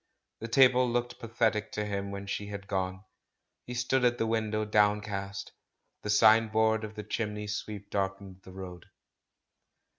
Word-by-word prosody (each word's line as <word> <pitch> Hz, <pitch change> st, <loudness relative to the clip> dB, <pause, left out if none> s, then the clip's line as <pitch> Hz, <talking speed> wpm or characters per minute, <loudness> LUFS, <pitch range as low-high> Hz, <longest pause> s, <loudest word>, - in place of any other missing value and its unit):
The 115 Hz, -, -5 dB
table 125 Hz, 0 st, +5 dB
looked 120 Hz, 0 st, -2 dB
pathetic 110 Hz, -2 st, 0 dB
to 105 Hz, -, -2 dB
him 100 Hz, -1 st, -3 dB
when 100 Hz, 0 st, -6 dB
she 100 Hz, +1 st, -4 dB
had 100 Hz, -1 st, -7 dB
gone. 95 Hz, -1 st, -2 dB, 0.6 s
He 125 Hz, -, -5 dB
stood 125 Hz, +1 st, +1 dB
at 120 Hz, 0 st, +3 dB
the 115 Hz, -, 0 dB
win 110 Hz, -1 st, 0 dB
dow, 110 Hz, 0 st, -1 dB
downcast; 105 Hz, -2 st, 0 dB, 0.5 s
the 105 Hz, -, -5 dB
signboard 110 Hz, 0 st, +4 dB
of 110 Hz, 0 st, -7 dB
the 105 Hz, -, -5 dB
chimney 105 Hz, 0 st, -3 dB
sweep 105 Hz, -1 st, -5 dB
darkened 95 Hz, -1 st, -3 dB
the 95 Hz, -, -13 dB
road. 90 Hz, -2 st, -9 dB
105 Hz, 155 wpm, -30 LUFS, 100-115 Hz, 0.6 s, table